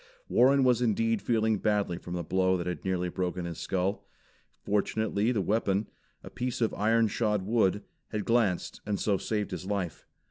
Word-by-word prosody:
Warren 135 +2 +4
was 125 -2 +3
indeed 115 -1 +1
feeling 110 -3 +1
badly 100 -5 0
from 90 -1 -6
the 85 - -2
blow 95 +2 +2
that 85 - -4
had 90 0 -4
nearly 90 -1 -1
broken 90 0 -3
his 85 -2 -6
skull. 95 +2 -2 0.6
Fortunately 105 +2 0
the 110 -5 0
weapon, 100 +1 0 0.3
a - - -10
piece 125 0 -3
of 115 -2 +1
iron 110 +2 +3
shod 105 -2 0
wood, 105 -1 +1 0.2
had 105 -2 -4
glanced 115 -7 +1
and 105 -1 -2
so 100 -2 +1
saved 105 -2 -2
his 95 - -5
life. 100 -4 -3
105 Hz, 175 wpm, -29 LUFS, 95-115 Hz, 0.6 s, Warren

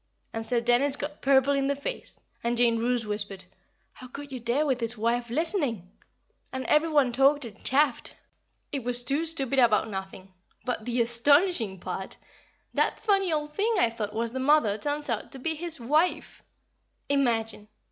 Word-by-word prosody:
and 225 - -3
Sir 245 -2 +2
Dennis 245 +4 +2
got 295 +1 -6
purple 275 0 +4
in 275 -1 +1
the 280 - +1
face, 285 - -5 0.2
and 235 +1 0
Jane 235 -1 +3
Roose 240 0 0
whispered, 205 -2 -4 0.5
"How 255 - -11
could 280 +3 -9
you 260 - -5
dare 240 +6 0
with 265 -4 0
his 230 0 -2
wife 235 +2 0
listening!" 265 - 0 0.6
and 260 0 -4
every 305 +2 +3
one 290 -5 +3
talked 275 +3 +3
and 215 -3 -12
chaffed. 275 -1 +1 0.6
It 275 -4 -3
was 245 0 +2
too 285 +7 0
stupid 275 -5 +1
about 225 -3 +3
nothing; 190 -1 -7 0.3
but 245 -4 -3
the 240 -1 +1
astonishing 240 - +2
part 185 +2 -4
is, - - -28 0.5
that - - +1
funny 390 -4 +1
old 300 -1 -2
thing 440 +6 +1
I 235 -11 +3
thought 215 -2 -5
was 230 +1 -1
the 260 - -4
mother 265 -6 +3
turns 290 +4 -2
out 230 -5 -3
to - - -6
be 320 +5 -1
his 325 -1 -2
wife! 300 +9 0 0.7
Imagine! 225 -6 0
255 Hz, 175 wpm, -27 LUFS, 230-290 Hz, 0.7 s, purple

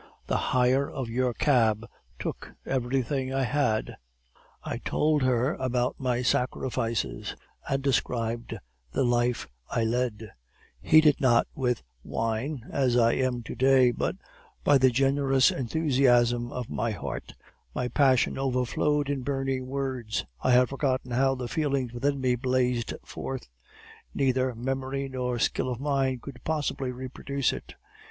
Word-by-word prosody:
The - - 0
hire 130 +2 +3
of 130 -4 -5
your 125 +1 +1
cab 115 -5 +2 0.3
took - - -6
everything 130 +1 -1
I 135 0 0
had.' 125 -5 0 0.7
"I - - -4
told 150 -1 +1
her 130 +1 +2
about 125 -1 -1
my 125 -1 0
sacrifices, 115 - -1 0.3
and 135 0 0
described 120 -3 -1 0.4
the - - +1
life 120 0 +1 0.2
I 115 - 0
led; 115 -2 -1 0.5
heated 155 - +5
not 120 -3 +4
with 125 - -1 0.2
wine, 115 +4 -2
as 130 -3 +2
I 115 -1 +5
am 125 -2 0
to - - -6
day, 130 -1 +5
but - - -2 0.5
by 145 -2 +5
the 130 0 +6
generous 135 +1 +3
enthusiasm 120 -3 +2
of 125 -2 -4
my 115 +2 -2
heart, 70 - -5 0.4
my 125 - -1
passion 130 0 +3
overflowed 135 +3 0
in 140 -2 -1
burning 135 -1 -2
words; 130 - -3 0.2
I - - +1
have 125 0 +5
forgotten 130 -2 -1
how 135 +2 +2
the 125 -2 -4
feelings 135 -3 -1
within 140 +3 0
me 130 -1 +2
blazed 125 -1 0
forth; 130 - -6 0.7
neither 130 -2 +1
memory 135 +3 -3
nor 125 -2 -2
skill 125 - 0
of 120 -2 -3
mine 135 -2 0
could 135 -2 -10
possibly 145 -4 -1
reproduce 130 +1 -2
it. - - -9
130 Hz, 135 wpm, -27 LUFS, 120-135 Hz, 0.7 s, the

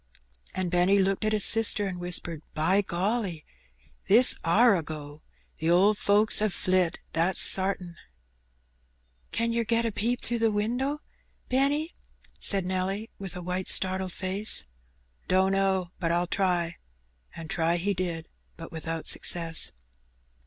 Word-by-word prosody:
And 185 -2 -3
Benny 180 +3 +3
looked 195 +1 0
at 215 - 0
his 215 -2 +5
sister 220 -2 +4
and 185 -2 -5
whispered 175 -2 -1
— - - -38
" - - -41
By 190 +5 +3
golly! 190 -2 -3 0.6
this 235 +6 +7
are 205 +6 +4
a 175 - -1
go. 150 -1 -9 0.4
The 160 +1 -1
owd 195 +5 +3
folks 210 +1 +2
'ave 215 -3 0
flit, 185 -2 0 0.2
that's 170 +3 +1
sartin." 185 -3 +4 1.3
"Can 230 0 -2
yer 235 0 0
get 230 +1 -1
a 230 - -1
peep 235 +4 -2
through 240 -1 -3
the 225 0 +2
winder, 245 +7 -2 0.5
Benny?" 285 +5 0 0.5
said 195 -3 +2
Nelly, 190 +4 -3
with 195 -1 -7
a 180 - -7
white, 180 +1 -4
startled 190 0 +2
face. 195 +3 0 0.6
"Dunno, 190 -1 +1
but 165 -2 -1
I'll 175 +1 0
try;" 175 -2 -1 0.6
and 165 -1 -9
try 165 +1 -1
he 200 +4 -1
did, 175 -3 -5 0.3
but 165 0 -10
without 165 0 -6
success. 165 -2 +1
190 Hz, 145 wpm, -26 LUFS, 175-210 Hz, 1.3 s, this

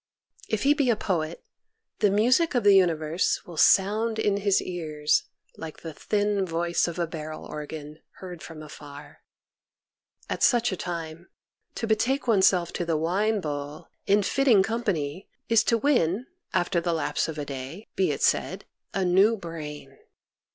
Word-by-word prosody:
If 220 - -1
he 285 +2 +5
be 285 -4 +1
a 235 - +4
poet 170 -5 -2 0.6
the 210 - +4
music 250 - +3
of 245 - +2
the 205 -1 +6
universe 165 -3 +2
will 175 - -10
sound 215 +7 +3
in 205 -2 +1
his 200 -1 +2
ears 155 -4 -1 0.3
like 160 -1 -8
the 165 -2 -7
thin 205 +4 0
voice 170 0 0
of 170 0 -5
a 170 - 0
barrel 155 -1 -7
organ, 150 0 -8
heard 180 -3 -9
from 155 -2 -9
afar. 145 -1 -12 1.1
At - - -4
such 240 -2 +3
a - - -1
time, 170 -1 -6 0.5
to - - -3
betake 230 +5 +1
oneself 190 -6 +3
to - - -2
the 165 -2 0
wine 200 +7 0
bowl, 145 -1 -6 0.2
in 205 +1 +4
fitting 245 -3 +4
com 230 +4 -2
pany, 160 -2 -2 0.2
is 230 -2 +5
to 230 - +3
win, 230 - +1 0.3
after 175 0 +1
the 170 0 -1
lapse 155 -2 -1
of 160 -1 -6
a 145 - -3
day, 140 +9 -7
be 190 -3 +2
it 145 - -2
said, - - +1 0.3
a 195 -1 +1
new 195 +6 +4
brain. 150 -6 -8
175 Hz, 165 wpm, -26 LUFS, 155-210 Hz, 1.1 s, the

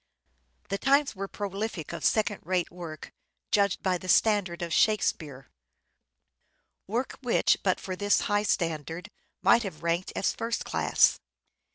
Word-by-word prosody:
The 195 0 -2
times 280 -2 +3
were 195 +1 -4
prolific 200 -5 -5
of 170 - -6
second 210 -2 +1
rate 180 0 -1
work, 170 -3 -9 0.4
judged 200 -2 +2
by 185 -2 +1
the 185 - -8
standard 190 -5 +2
of 170 - -3
Shakespeare; 155 - +1 1.4
work 235 +6 -3
which, 245 -3 +2
but 185 -2 +1
for 185 - -5
this 205 +2 +2
high 205 0 +1
standard, 165 -3 -2 0.3
might 235 - +6
have 190 -7 -7
ranked 170 +2 -1
as - - 0
first 230 0 -3
class. - - +3
190 Hz, 140 wpm, -28 LUFS, 170-210 Hz, 1.4 s, might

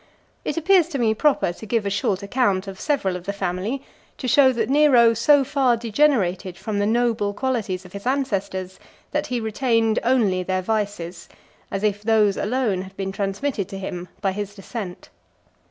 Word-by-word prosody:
It - - -3
appears 350 +1 +4
to 325 -5 -4
me 225 -3 +2
proper 270 - +2
to 220 - -11
give 225 -1 0
a 200 - -1
short 195 0 0
account 200 -3 +1
of 190 -1 -8
several 275 -12 0
of 180 -1 -7
the 200 - -1
family, 200 +7 -3 0.3
to 255 - -4
show 265 +1 +6
that 230 -3 -1
Nero 265 -5 +5
so 275 +5 +4
far 265 -3 +2
degenerated 210 -7 +1
from 210 +1 -3
the 205 - +1
noble 225 -3 +1
qualities 210 -8 -2
of 185 - -14
his 200 +4 -6
ancestors, 195 -8 -2 0.3
that 295 0 -1
he 250 -1 -1
retained 225 0 +1
only 225 -7 +2
their 185 0 -1
vices; 195 -5 -3 0.4
as 195 +1 -3
if 205 -1 0
those 210 -2 +3
alone 215 -4 0
had 190 +1 -11
been 195 -1 -3
transmitted 200 +2 -2
to 195 - -6
him 180 -2 -5
by 195 -2 +1
his 205 +1 -5
descent. 195 -2 -7
210 Hz, 180 wpm, -23 LUFS, 195-255 Hz, 0.4 s, show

